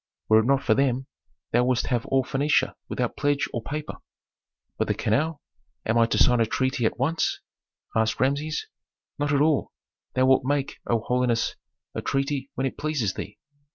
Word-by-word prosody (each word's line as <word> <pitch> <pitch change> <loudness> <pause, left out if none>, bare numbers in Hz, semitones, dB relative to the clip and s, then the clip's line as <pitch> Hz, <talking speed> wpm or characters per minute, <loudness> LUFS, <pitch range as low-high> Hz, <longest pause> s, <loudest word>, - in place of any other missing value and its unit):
Were 110 0 +7
it 110 - +1
not 140 0 +3
for 110 - +4
them, 130 0 +1 0.5
thou 120 +1 +4
wouldst 125 -1 +1
have 120 -3 -1
all 135 -1 +2
Phœnicia 135 0 +1 0.2
without 125 -2 -2
pledge 145 -1 +1
or 120 - -2
paper." 150 +5 -5 0.8
"But - - +1
the - - +1
canal? 145 +8 0 0.4
Am 110 - +1
I 115 - +5
to - - 0
sign 125 -1 +5
a 115 - +3
treaty 130 -1 +1
at - - -4
once?" 160 +6 0 0.6
asked 110 -1 +1
Rameses. 145 +4 0 0.5
"Not 145 0 0
at 140 -1 +3
all. 150 -2 +2 0.4
Thou 130 - +4
wilt 130 0 +4
make, 140 +1 -1
O 115 -2 +2
holiness, 125 -1 +1 0.4
a - - -3
treaty 135 0 -1
when 135 - -1
it 135 - -4
pleases 145 -11 0
thee." 105 - -7
130 Hz, 180 wpm, -25 LUFS, 120-140 Hz, 0.8 s, Were